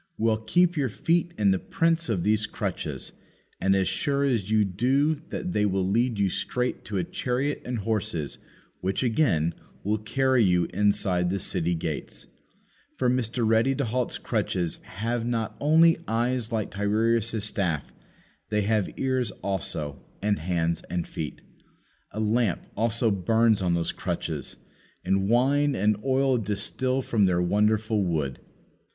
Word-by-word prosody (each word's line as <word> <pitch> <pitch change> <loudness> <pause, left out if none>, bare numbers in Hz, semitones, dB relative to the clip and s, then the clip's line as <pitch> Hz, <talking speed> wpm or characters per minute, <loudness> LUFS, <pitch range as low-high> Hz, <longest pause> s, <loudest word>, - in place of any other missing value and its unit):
Well, 110 -1 +2
keep 175 +10 +2
your 135 -3 +1
feet 170 - 0
in 100 -2 +3
the 95 - +1
prints 165 -2 0
of 95 -7 0
these 105 0 +2
crutches, - - -4 0.5
and 95 +1 +3
as 95 -1 +2
sure 140 +9 0
as 115 -8 0
you 110 -1 +3
do 130 - +2 0.2
that 180 - -4
they 105 - +2
will 95 -2 +1
lead 115 +3 +1
you 100 -1 +2
straight 125 +6 -2
to 105 - -3
a 90 - +1
chariot 130 +9 -2
and 125 -1 -2
horses, 100 -8 -2 0.4
which, 95 +6 -1
again, 100 - +2 0.3
will 105 +2 0
carry 130 +3 +2
you 90 -3 +3
inside 95 -3 +1
the 95 - 0
city 90 -2 0
gates. 80 -2 -5 0.7
For 125 -1 +1
Mr. 120 -2 0
Ready 115 +5 +3
to 140 - -1
halt's 120 +2 -1
crutches 85 -3 -1
have 115 +4 -3
not 115 -2 -2
only 160 +2 +5
eyes 120 +1 0
like 110 -3 -2
Tiresias' 110 +2 +1
staff, 90 -8 -1 0.6
they 105 -1 +1
have 105 -1 +1
ears 130 -3 0
also, 80 -7 -3 0.2
and 105 0 0
hands 85 -1 -1
and 90 -1 -2
feet. 75 -2 -6 0.7
A 110 - -6
lamp 110 -3 +1
also 115 +1 +1
burns 110 +3 +2
on 90 -2 +1
those 85 -1 -1
crutches; - - -4 0.5
and 95 +1 +1
wine 140 +4 +3
and 105 +2 +2
oil 135 -1 +2
distil 115 +6 -1
from 110 -5 +2
their 90 -1 +2
wonderful 105 +3 +2
wood. 75 -7 -1
110 Hz, 150 wpm, -26 LUFS, 95-125 Hz, 0.7 s, only